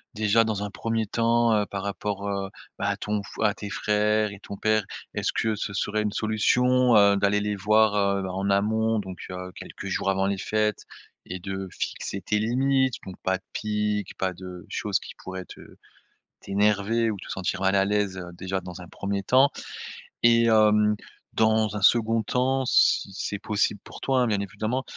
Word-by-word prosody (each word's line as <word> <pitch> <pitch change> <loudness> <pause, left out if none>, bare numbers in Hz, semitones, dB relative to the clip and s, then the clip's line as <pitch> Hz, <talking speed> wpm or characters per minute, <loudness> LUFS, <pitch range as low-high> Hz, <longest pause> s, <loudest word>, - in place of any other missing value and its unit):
déjà 110 +1 +3
dans 110 -2 -2
un 105 - -3
1er 115 +1 -1
temps, 115 +1 +2
heu, 105 -1 +2
par 100 -1 -5
rapport, 100 0 -3
heu, 100 -1 -2 0.3
bah 100 - 0
à 100 - -1
ton 105 0 -2
f 95 - -12
à 105 -2 +3
tes 100 - -7
frères 105 +1 +1
et 100 - -11
ton 100 - -8
père, 110 0 +2 0.3
est-ce - - -1
que 110 -1 0
ce 105 0 -4
serait 105 +1 -1
une 105 -1 -1
solution, 125 +4 +3
heu, 100 -1 +6
d'aller 100 +1 +2
les 105 0 -1
voir, 105 +1 +3
heu, 100 -1 +1
en 95 +2 -2
amont 110 +3 +2
donc 95 -2 -7
heu, 90 0 -6
quelques - - -9
jours - - -1
avant 95 0 +1
les 100 0 -1
fêtes 105 +1 0 0.4
et 95 - -6
de 95 +1 -5
fixer 100 - -4
tes 105 +3 0
limites? 130 +3 +2
Donc 95 - -8
pas 95 0 +1
de 95 - -26
pique, 105 -1 -2
pas 95 -1 -1
de 90 -1 -9
choses - - -1
qui - - -10
pourraient 95 0 -6
te - - -12 0.8
t'énerver 105 +3 +1
ou 105 - -3
te 100 - -11
sentir 95 0 -2
mal 95 0 +2
à 95 0 +4
l'aise, 100 -2 -1
déjà, 95 +2 -3
dans 90 -1 -9
un 90 - -10
1er 100 +2 -3
temps. 130 +7 +5 0.7
Et 115 0 +5
hem, 105 -1 +4 0.4
dans 110 -1 +2
un 105 - -3
2nd 115 +1 +4
temps, 130 +4 0
si 100 - +3
c'est 100 0 -3
possible 105 0 0
pour - - -11
toi, 130 -1 +2
hein, 125 - +2
bien 105 -3 +1
évidemment. 110 +6 -2
105 Hz, 190 wpm, -26 LUFS, 100-110 Hz, 0.8 s, heu